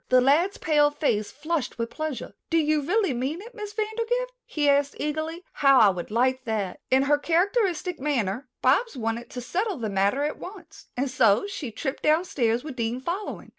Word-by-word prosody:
The 255 - +6
lad's 305 +10 +3
pale 295 -2 +3
face 230 -9 0
flushed 310 -2 -3
with 230 0 -3
pleasure. 310 -4 -5 0.2
"Do 330 - +2
you 305 -1 +2
really 380 +1 +1
mean 265 +7 -2
it, 465 +5 -11
Miss 420 -2 -6
Vandergrift?" 460 +3 -1 0.2
he 295 -2 0
asked 280 0 +3
eagerly. 315 +3 -3
"How 275 -2 +5
I 215 -4 +7
would 180 -2 -4
like 255 +4 +1
that." 210 -5 -2
In 265 +1 +4
her 290 +1 +3
characteristic 360 +1 +1
manner 255 -4 -1
Bobs 285 - +3
wanted 230 0 -3
to 250 - -6
settle 380 - -2
the 225 -4 -3
matter 200 +8 +1
at 300 - -2
once, 360 -5 -11
and 270 +3 0
so 225 - +3
she 365 -10 -5
tripped 265 +5 -4
downstairs 285 -8 +1
with 295 -4 -7
Dean 230 +1 -1
following. 350 +9 -5
290 Hz, 185 wpm, -26 LUFS, 250-345 Hz, 0.2 s, I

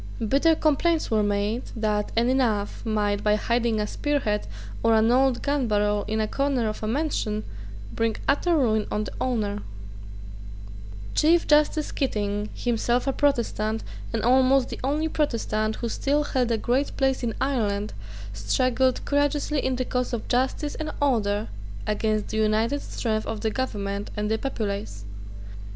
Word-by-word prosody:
Bitter 300 +7 +4
complaints 315 +1 +1
were 220 -1 +3
made 205 +3 0
that 210 -2 -1
any 240 +3 +3
knave 220 -6 0
might, 205 -2 0
by 210 0 +4
hiding 235 0 0
a 210 - 0
spear 290 +7 -1
head 210 -4 -1 0.3
or 225 0 +4
an 220 +1 +4
old 260 0 +3
gun 285 -3 +1
barrel 210 -1 +1
in 220 +1 -1
a 215 - +1
corner 275 -2 0
of 215 - -4
a 215 - -2
mansion, 225 -5 -1 0.5
bring 225 -1 0
utter 325 +4 +3
ruin 220 -6 +2
on 210 - -1
the 210 - -6
owner, 210 -5 -1 1.5
Chief 335 +2 +4
Justice 300 0 +3
Keating, 205 -5 -1
himself 240 +1 0
a 270 - 0
Protestant, 225 -6 0 0.3
and 225 -2 -2
almost 260 +1 +4
the - - -6
only 295 +4 0
Protestant 220 -8 -1
who 235 - -3
still 290 +5 +1
held 255 -4 0
a 230 - +1
great 250 +6 0
place 265 -1 +1
in 230 -3 -2
Ireland, 215 -7 -1 0.4
struggled 255 - +1
courageously 290 0 +1
in 260 0 0
the 255 0 -2
cause 250 0 -2
of 235 - -3
justice 265 +4 0
and 310 -1 -4
order 215 -7 +1 0.4
against 215 0 0
the - - -3
united 220 +6 +1
strength 215 -2 -2
of 220 -1 -4
the 220 - 0
government 205 -5 -3
and 210 +1 -1
the 220 - +1
populace. 200 - -4
230 Hz, 160 wpm, -25 LUFS, 215-270 Hz, 1.5 s, Bitter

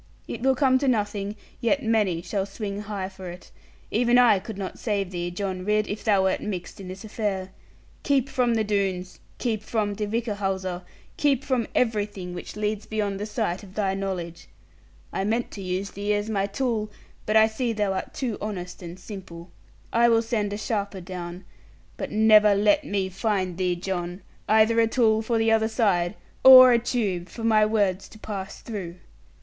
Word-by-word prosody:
It - - -6
will 265 +1 +3
come 260 -1 +3
to 275 - -1
nothing; 205 -3 0 0.2
yet 270 +4 +1
many 210 -7 +1
shall 195 0 -2
swing 200 0 -5
high 205 -3 -4
for 190 -1 -9
it. 175 +1 -11 0.4
Even 240 +2 +3
I 235 -5 +6
could 215 +1 -8
not 195 -2 -5
save 200 -4 -1
thee, 175 -1 -3
John 185 0 -4
Ridd, 210 +1 +1
if 205 - -5
thou 200 -4 +3
wert 190 0 +1
mixed 195 0 -5
in 190 - -8
this 185 +2 -8
affair. 205 -4 -3 0.5
Keep 275 -2 +2
from 245 -3 +1
the 220 - +2
Doones, 195 -3 -2 0.2
keep 225 -4 -1
from 215 -2 -1
De 210 +1 -3
Whichehalse, 195 -5 -2 0.4
keep 280 -2 +2
from 255 -5 0
everything 205 -6 -1
which 175 - -7
leads 210 0 -2
beyond 205 -3 -2
the 210 - -3
sight 210 -5 -2
of 195 -2 -14
thy 195 -3 0
knowledge. 185 -4 -4 0.7
I 190 - -1
meant 225 +4 -1
to 200 - -7
use 185 +1 -3
thee 205 +2 -1
as 205 +2 -2
my 200 -2 0
tool; 220 -1 -1 0.4
but 215 - +1
I 220 - +7
see 225 +2 -1
thou 210 -3 0
art 190 - -4
too 255 -8 -3
honest 185 -4 -5
and 175 0 -8
simple. 180 -4 -9 0.4
I 235 +1 +5
will 230 0 +4
send 215 -3 -1
a 205 - -3
sharper 205 -3 -3
down; 175 0 -7 0.5
but - - -4
never 215 -1 +6
let 210 +10 +3
me 200 -6 -1
find 190 -2 -1
thee, 180 0 0
John, 180 0 -4 0.3
either 220 +1 +5
a 225 - +4
tool 220 -2 +3
for 230 +1 0
the 225 0 +2
other 220 0 +3
side, 200 -5 +1 0.3
or 255 -1 +11
a 235 - +4
tube 205 -7 -2
for 230 - -8
my 215 -2 +4
words 200 -4 0
to - - -14
pass 200 -2 -6
through.' 190 -7 -6
205 Hz, 190 wpm, -25 LUFS, 190-225 Hz, 0.7 s, or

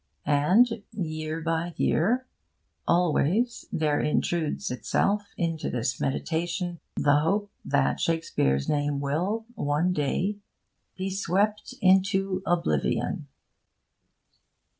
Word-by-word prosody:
And, 200 +11 +3
year 155 -3 -3
by 165 +1 -1
year, 240 +11 +2 0.6
always 180 - +2
there 150 -2 +1
intrudes 155 -1 0
itself 200 +10 0
into 165 -3 -1
this 125 0 -2
meditation 170 +4 -2 0.2
the 145 0 +4
hope 200 +6 0
that 140 -1 +1
Shakespeare's 70 - 0
name 145 -1 0
will, 180 +11 -1
one 150 +1 0
day, 180 +7 -1 0.6
be 190 +1 -2
swept 200 +3 0
into 190 0 +3
oblivion. 170 - 0
170 Hz, 95 wpm, -27 LUFS, 150-195 Hz, 0.6 s, the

